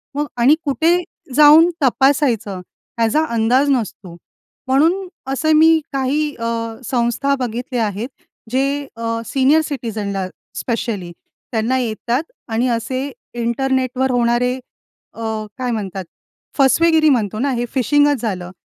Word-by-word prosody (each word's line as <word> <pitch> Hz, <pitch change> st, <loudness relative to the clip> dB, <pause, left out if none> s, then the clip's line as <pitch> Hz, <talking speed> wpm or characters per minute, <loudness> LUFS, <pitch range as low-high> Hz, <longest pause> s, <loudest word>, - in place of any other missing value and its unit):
मग 295 Hz, +1 st, 0 dB
आणि 265 Hz, +6 st, +6 dB
कुठे 320 Hz, +5 st, +2 dB, 0.4 s
जाऊन 305 Hz, +3 st, +8 dB
तपासायचं, 250 Hz, -7 st, +2 dB, 0.4 s
याचा 230 Hz, +8 st, +3 dB
अंदाज 250 Hz, +5 st, +3 dB
नसतो. 210 Hz, -8 st, -3 dB, 0.5 s
म्हणून 330 Hz, +9 st, +2 dB, 0.3 s
असे 315 Hz, +3 st, +1 dB
मी 320 Hz, +1 st, +6 dB
काही 290 Hz, +3 st, 0 dB
अ, 230 Hz, 0 st, -1 dB, 0.3 s
संस्था 245 Hz, +4 st, 0 dB
बघितल्या 245 Hz, 0 st, -2 dB
आहेत. 210 Hz, +4 st, -4 dB, 0.4 s
जे 275 Hz, +2 st, 0 dB
अ, 230 Hz, 0 st, -2 dB
सीनियर 275 Hz, +5 st, +3 dB
सिटिझनला 210 Hz, -9 st, -3 dB, 0.3 s
स्पेशली 215 Hz, -7 st, -3 dB, 0.4 s
त्यांना 235 Hz, +2 st, 0 dB
येतात 240 Hz, +3 st, -1 dB, 0.3 s
आणि 235 Hz, +3 st, +1 dB
असे 255 Hz, +4 st, -2 dB, 0.2 s
इंटरनेटवर 255 Hz, +2 st, 0 dB
होणारे 245 Hz, +1 st, +1 dB, 0.6 s
अ, -, -, -10 dB, 0.4 s
काय 250 Hz, -1 st, -2 dB
म्हणतात? 195 Hz, -4 st, -4 dB, 0.5 s
फसवेगिरी 310 Hz, +3 st, +4 dB
म्हणतो 215 Hz, -6 st, 0 dB
ना, 275 Hz, +3 st, 0 dB
हे 240 Hz, -1 st, -1 dB
फिशिंगच 290 Hz, +1 st, +2 dB
झालं. 185 Hz, -5 st, -3 dB
255 Hz, 115 wpm, -19 LUFS, 230-285 Hz, 0.6 s, जाऊन